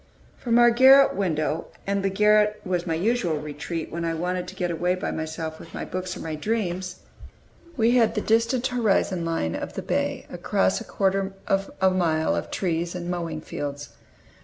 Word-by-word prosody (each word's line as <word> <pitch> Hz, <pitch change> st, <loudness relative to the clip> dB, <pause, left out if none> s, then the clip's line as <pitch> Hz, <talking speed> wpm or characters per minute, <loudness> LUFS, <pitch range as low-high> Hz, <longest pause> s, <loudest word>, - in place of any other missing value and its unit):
From 235 Hz, -1 st, +1 dB
our 240 Hz, 0 st, +7 dB
garret 265 Hz, +3 st, +7 dB
window 160 Hz, -5 st, -1 dB, 0.2 s
and 200 Hz, 0 st, 0 dB
the 195 Hz, -, +1 dB
garret 210 Hz, +1 st, +3 dB
was 180 Hz, -1 st, -1 dB
my 165 Hz, -, 0 dB
usual 180 Hz, -3 st, 0 dB
retreat 150 Hz, +2 st, -5 dB
when 170 Hz, +1 st, -4 dB
I 165 Hz, -1 st, -1 dB
wanted 180 Hz, +2 st, -2 dB
to 190 Hz, -, -9 dB
get 180 Hz, -2 st, -1 dB
away 175 Hz, +2 st, 0 dB
by 185 Hz, -, -3 dB
myself 160 Hz, 0 st, -5 dB
with 165 Hz, -, -12 dB
my -, -, -4 dB
books 185 Hz, 0 st, -4 dB
or -, -, -8 dB
my 160 Hz, -, -4 dB
dreams 185 Hz, 0 st, -3 dB, 0.8 s
we 230 Hz, 0 st, +4 dB
had 240 Hz, -2 st, +3 dB
the 210 Hz, -, 0 dB
distant 230 Hz, +4 st, +1 dB
horizon 210 Hz, -8 st, +1 dB
line 125 Hz, -, -1 dB
of -, -, -5 dB
the -, -, -5 dB
bay, -, -, -1 dB
across 95 Hz, 0 st, 0 dB
a -, -, -8 dB
quarter 195 Hz, 0 st, 0 dB
of 195 Hz, 0 st, 0 dB
a 190 Hz, 0 st, +4 dB
mile 165 Hz, -4 st, +1 dB
of -, -, -3 dB
trees 170 Hz, -1 st, -2 dB
and 175 Hz, 0 st, -4 dB
mowing 165 Hz, -3 st, -3 dB
fields. 145 Hz, -2 st, -5 dB
180 Hz, 185 wpm, -25 LUFS, 165-210 Hz, 0.8 s, our